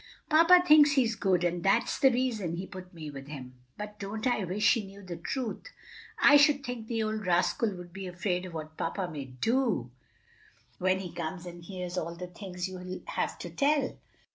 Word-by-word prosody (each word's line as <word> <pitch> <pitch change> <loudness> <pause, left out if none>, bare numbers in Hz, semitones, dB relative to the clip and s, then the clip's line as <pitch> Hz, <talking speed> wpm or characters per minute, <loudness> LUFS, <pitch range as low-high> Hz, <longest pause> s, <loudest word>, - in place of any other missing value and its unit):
"Papa 335 +3 +7
thinks 295 -2 +8
he's 250 -5 +3
good, 190 -4 +1
and 175 0 0
that's 195 +3 +2
the 270 - +6
reason 235 -9 -1
he 180 +3 -4
put 185 -1 -10
me 160 -4 -8
with 135 -1 -9
him. 130 -4 -8
Oh, 125 - -27 0.2
but 210 0 -7
don't 210 +3 -5
I 245 -5 +1
wish 190 +4 +3
he 230 - -1
knew 200 +1 -12
the 180 -2 -6
truth!" 250 - -4 0.5
"I 290 - +8
should 285 -1 +4
think 245 -4 -5
the 225 -1 -1
old 215 0 -2
rascal 185 +4 +2
would 175 -1 -10
be 190 0 -6
afraid 180 0 -2
of 175 - -10
what 155 0 -7
papa 180 +3 -2
may 150 -5 -6
do 180 - 0 0.9
when 185 +1 +2
he 180 -3 -6
comes 170 +2 -5
and 175 -1 -9
hears 180 0 -4
all 170 0 -5
the 180 +1 -6
things 180 0 -6
you'll 185 0 -7
have - - -2
to - - -7
tell." 285 -1 +1
190 Hz, 200 wpm, -29 LUFS, 175-230 Hz, 0.9 s, thinks